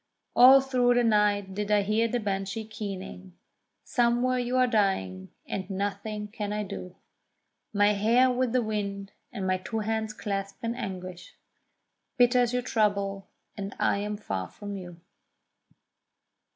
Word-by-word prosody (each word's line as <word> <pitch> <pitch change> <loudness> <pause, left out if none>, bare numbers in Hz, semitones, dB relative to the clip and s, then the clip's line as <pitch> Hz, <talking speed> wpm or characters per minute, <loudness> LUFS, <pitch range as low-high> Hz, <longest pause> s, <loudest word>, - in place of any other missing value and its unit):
All 265 +2 +9
through 250 -2 +2
the 245 - +3
night 205 -3 +2
did 205 +1 -3
I 210 -1 +4
hear 215 +3 +2
the 245 +2 -1
Banshee 200 +1 -3
keening: 190 -4 -7 0.5
Somewhere 245 +1 +1
you 245 +1 -1
are 255 - +5
dying, 190 - 0 0.2
and 190 0 -4
nothing 205 +2 -3
can 210 -1 -4
I 210 0 -1
do; 185 -2 -7 0.8
My 205 0 +4
hair 235 +5 +4
with 250 -1 0
the 250 0 +2
wind, 200 -2 -3 0.2
and 195 -5 -4
my 185 0 +1
two 220 +4 -3
hands 220 0 -2
clasped 200 -1 -4
in 230 0 -1
anguish; 185 -6 -7 0.8
Bitter 245 0 +5
is 240 -1 +1
your 250 0 -1
trouble—and 200 -2 -2
I - - +1
am 210 +1 -3
far 95 - -4
from 205 - -8
you. 175 -3 -9
210 Hz, 145 wpm, -28 LUFS, 195-235 Hz, 0.8 s, All